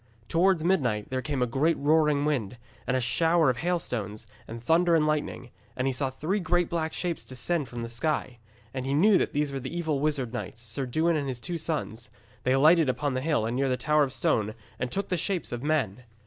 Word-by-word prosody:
Towards 175 -1 +3
midnight 130 - +1
there 130 0 -1
came 140 -2 -1
a - - +3
great 140 +7 +1
roaring 150 -1 +3
wind, 125 -7 -1 0.3
and 130 - +2
a - - +1
shower 160 +5 +3
of 125 - -6
hailstones, 120 - -2 0.2
and 115 +1 -7
thunder 165 +7 +3
and 155 -2 +3
lightning, 150 -5 -2 0.3
and 125 - 0
he 135 - +1
saw 135 +1 0
three 155 +10 -2
great 175 -1 +1
black 160 -2 -1
shapes 175 -1 -3
descend 140 +4 -2
from 120 0 -6
the 115 - -4
sky. 125 0 -2 0.3
And 130 -1 -3
he 135 - +1
knew 195 +6 +5
that - - 0
these 145 0 0
were 135 - -3
the 135 +6 -5
evil 160 -5 0
wizard 140 -5 -1
knights, 120 -1 -5
Sir 125 +4 -3
Dewin 160 +6 +1
and 140 -2 -2
his 130 -2 -3
two 170 +6 -4
sons. 130 -9 -3 0.3
They 130 - +1
alighted 155 +2 +5
upon 140 +2 -1
the 130 - -1
hill 150 -6 +1
near 130 +4 0
the 125 - +1
Tower 150 +2 +2
of 135 - -2
Stone, 110 -3 0 0.2
and 125 0 -2
took 200 0 -2
the 180 - 0
shapes 180 0 -2
of 120 - -4
men. 140 -7 0
145 Hz, 220 wpm, -27 LUFS, 125-160 Hz, 0.3 s, knew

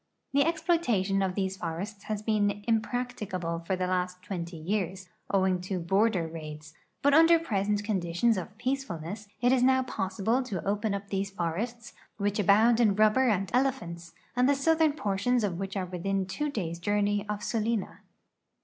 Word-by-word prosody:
The 280 +1 +5
exploitation 315 - +1
of 190 -1 -1
these 190 -1 -1
forests 195 +5 -5
has 215 -1 -3
been 205 -2 +1
impracticable 220 -7 -1
for 170 +3 -2
the 185 0 -1
last 180 0 -2
twenty 175 -3 -5
years, 185 +2 -2 0.2
owing 190 -2 +2
to 185 +1 -3
border 195 0 +2
raids, 155 -1 -8 0.3
but 285 0 +4
under 330 +2 +7
present 205 -9 -1
conditions 200 +2 +1
of 190 +2 -6
peacefulness 210 - -3
it 245 +1 +4
is 260 -1 +3
now 260 +1 +4
possible 215 +1 -1
to 215 -9 -5
open 205 +1 0
up 200 0 -6
these 195 0 -1
forests, 210 +6 -4 0.2
which 205 0 -1
abound 220 +4 +5
in 215 -4 +4
rubber 215 +5 +4
and 195 -3 0
elephants, 175 -11 -1 0.2
and 250 +2 +3
the 285 - +4
southern 315 +2 +3
portions 225 -1 0
of 185 -4 -1
which 195 0 -4
are 185 - -1
within 190 +2 -2
two 295 +11 -2
days' 170 - -3
journey 205 +2 +1
of 210 0 -3
Sulina. 225 0 -1
205 Hz, 165 wpm, -29 LUFS, 185-235 Hz, 0.3 s, under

